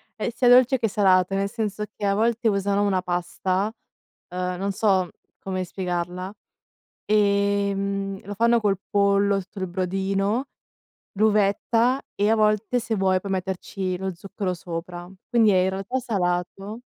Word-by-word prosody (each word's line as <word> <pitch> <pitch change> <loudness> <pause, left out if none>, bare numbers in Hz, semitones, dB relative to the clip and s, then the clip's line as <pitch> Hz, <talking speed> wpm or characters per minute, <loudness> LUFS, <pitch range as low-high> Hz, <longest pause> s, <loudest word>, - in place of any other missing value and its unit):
è 220 - -2
sia 245 -1 +3
dolce 255 +1 +6
che 225 - +1
salato, 195 -2 +3
nel 200 0 0
senso 210 -2 -3
che 205 - -4
a 200 0 +2
volte 230 +2 +1
usano 200 0 +1
una 190 -2 +1
pasta, 185 +3 -1 0.6
uhm, 180 0 -2
non 200 +1 -1
so, 190 -3 +1 0.3
come 185 -1 -3
spiegarla, 180 +1 -4 0.7
ehm, 200 -1 +1
lo 205 - -5
fanno 235 +2 +3
col 200 -3 +1
pollo, 200 0 +3
sul 190 -2 -5
brodino, 195 +6 -1 0.7
l'uvetta 220 +4 +2
e 205 +2 +1
a - - +5
volte 215 +3 +2
se 225 -1 -2
vuoi, 190 -1 +2
puoi 195 0 -4
metterci 185 0 -3
lo 190 -1 -3
zucchero 190 +1 -4
sopra. 175 +1 -7 0.2
Quindi 230 -4 +4
è 185 - +4
in 190 - +1
realtà 195 +7 -3
salato, 195 0 -2
195 Hz, 145 wpm, -24 LUFS, 185-210 Hz, 0.7 s, dolce